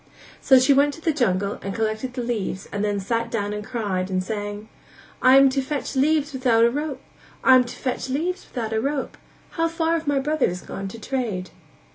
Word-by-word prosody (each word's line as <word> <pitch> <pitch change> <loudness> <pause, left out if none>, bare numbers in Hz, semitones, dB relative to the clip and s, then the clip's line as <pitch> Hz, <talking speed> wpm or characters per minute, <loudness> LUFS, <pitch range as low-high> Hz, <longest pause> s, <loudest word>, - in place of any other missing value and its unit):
So 265 - +6
she 260 +2 +5
went 285 +1 +3
to 325 - -14
the 320 -1 +1
jungle 200 -7 0
and 195 0 -5
collected 220 +3 -2
the 250 - -2
leaves 210 -5 -3
and 205 0 -2
then 205 -1 0
sat 230 +4 -1
down 210 -3 -2
and 210 0 -4
cried 200 -6 -2
and 185 -1 0
sang: 205 +1 -5 0.5
"I 255 +1 +7
am 275 0 +7
to 270 +1 0
fetch 285 +1 -4
leaves 295 +1 +2
without 245 -3 +3
a 235 - +3
rope 285 0 -3 0.4
I 260 - +7
am 255 -1 +6
to 240 - -8
fetch 260 0 -3
leaves 350 +8 -2
without 225 -3 -4
a 220 - +1
rope 280 +1 -2 0.4
How 330 -1 0
far 330 0 0
have 325 -2 -2
my 285 -1 +2
brothers 270 - 0
gone 195 - -6
to 225 +4 -9
trade?" 220 -7 -3
245 Hz, 210 wpm, -23 LUFS, 210-280 Hz, 0.5 s, I